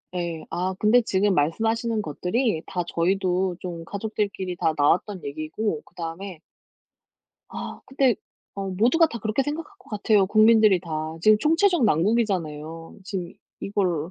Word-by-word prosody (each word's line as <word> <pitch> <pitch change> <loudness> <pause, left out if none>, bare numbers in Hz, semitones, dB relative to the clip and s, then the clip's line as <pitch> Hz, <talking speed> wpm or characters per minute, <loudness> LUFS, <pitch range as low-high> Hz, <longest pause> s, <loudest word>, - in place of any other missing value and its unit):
예. 170 -3 -3
아 185 +2 -2
근데 220 +4 +5
지금 200 -2 +1
말씀하시는 225 +9 0
것들이 180 - -1
다 180 -2 -3
저희도 185 +1 0
좀 170 -2 -6
가족들끼리 200 -2 -3
다 160 - +1
나왔던 180 +6 +1
얘기고 155 +5 -3
그다음에 175 +1 -7 1.1
아 - - -7
근데 265 -3 +2 0.4
어 195 -1 -4
모두가 240 - +4
다 235 -7 -6
그렇게 220 +4 0
생각할 320 +7 -4
것 385 - -20
같아요. 210 -2 +3
국민들이 215 -2 +5
다. 170 -2 -11 0.3
지금 215 +5 +6
총체적 330 - +3
난국이잖아요. 165 -5 0
지금 185 -3 -5 0.3
이걸 180 -5 -1
195 Hz, 310 characters per minute, -24 LUFS, 170-225 Hz, 1.1 s, 지금